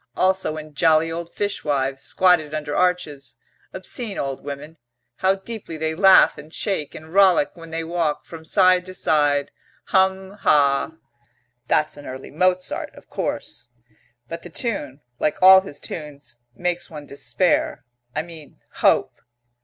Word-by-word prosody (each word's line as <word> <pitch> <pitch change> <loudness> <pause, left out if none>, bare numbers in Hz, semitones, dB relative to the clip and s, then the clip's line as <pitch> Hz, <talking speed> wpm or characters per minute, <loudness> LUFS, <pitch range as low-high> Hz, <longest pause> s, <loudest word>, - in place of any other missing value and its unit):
Also 185 -4 +1
in 155 -1 -9
jolly 160 +1 +3
old 170 +1 -5
fishwives, 140 -9 -2
squatted 165 -4 +2
under 150 -1 -3
arches, 150 -10 -1 0.3
obscene 200 +3 -6
old 135 -1 -4
women, 145 +3 -8 0.4
how 190 +1 +2
deeply 195 -4 -8
they 160 0 -1
laugh 190 0 +6
and 150 +1 -12
shake 170 -5 -2
and 160 +1 -11
rollick, 190 -6 +5
when 165 -1 -12
they 165 0 -3
walk, 165 -2 -2
from 165 -1 -10
side 185 +1 +4
to 185 - -9
side, 145 -4 +1 0.4
hum, 190 0 +2
hah! 140 +1 +3 0.7
"That's 150 -1 +1
an 145 - -10
early 130 +1 -8
Mozart, 185 +3 0
of - - -17
course 120 0 -4 0.3
" 120 0 -40
"But 165 +5 -6
the 175 - -10
tune, 155 - -4 0.2
like 150 - 0
all 190 +1 +9
his 145 -7 -8
tunes, 145 -6 -9 0.2
makes 175 0 -2
one 150 -2 -9
despair 140 -2 0 0.3
I - - -1
mean 160 -3 -13 0.2
hope. - - +3
160 Hz, 145 wpm, -22 LUFS, 145-185 Hz, 0.7 s, all